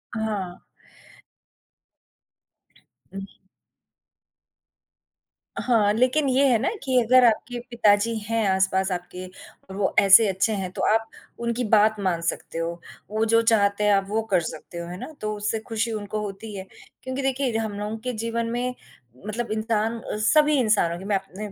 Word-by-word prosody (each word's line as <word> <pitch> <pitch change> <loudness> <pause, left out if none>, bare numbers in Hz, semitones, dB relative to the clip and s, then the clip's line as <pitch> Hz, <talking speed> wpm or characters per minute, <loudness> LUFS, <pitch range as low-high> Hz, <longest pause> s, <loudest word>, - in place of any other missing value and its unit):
हाँ। 205 -5 -3 2.5
हुँ। 195 0 -6 2.3
हाँ, 215 -4 +2
लेकिन 255 +5 +2
ये 270 +2 +3
है 240 -3 +4
ना 270 - 0
कि 260 -2 +2
अगर 255 +2 +5
आपके 240 +2 +1
पिताजी 225 -1 +2
हैं 225 -2 0
आस-पास 190 0 +1
आपके 180 +1 -5 0.4
और 190 - -8
वो 200 -1 0
ऐसे 200 +2 +7
अच्छे 190 +4 0
हैं, 190 -2 -3
तो - - -5
आप 225 0 0 0.3
उनकी 235 +1 -2
बात 215 0 +4
मान 180 -4 -1
सकते 165 0 -4
हो। 165 0 -1 0.4
वो 215 +1 -1
जो 230 +1 +4
चाहते 210 -2 +2
हैं 210 0 +4
आप 195 -1 +2
वो 220 +2 0
कर 180 -2 +4
सकते 160 +2 -8
हो। 170 0 -5
है 180 +1 -7
ना? - - -7
तो 215 0 -2
उससे 210 +2 -2
ख़ुशी 225 +1 -1
उनको 210 0 -4
होती 205 +1 -7
है 190 0 -7 0.4
क्योंकि 260 +1 -4
देखिए 265 -3 0
हम 215 -2 -3
लोगों 210 +2 -4
के 250 +2 -4
जीवन 230 +1 -2
में 250 +1 -2 0.5
मतलब 225 +1 -4
इंसान 220 +1 -1
अ, 210 - -5
सभी 300 +7 +3
इंसानो 205 -7 +2
की 190 - -9
मैं 205 -1 0
अपने 195 +2 -9
215 Hz, 160 wpm, -24 LUFS, 195-230 Hz, 2.5 s, ऐसे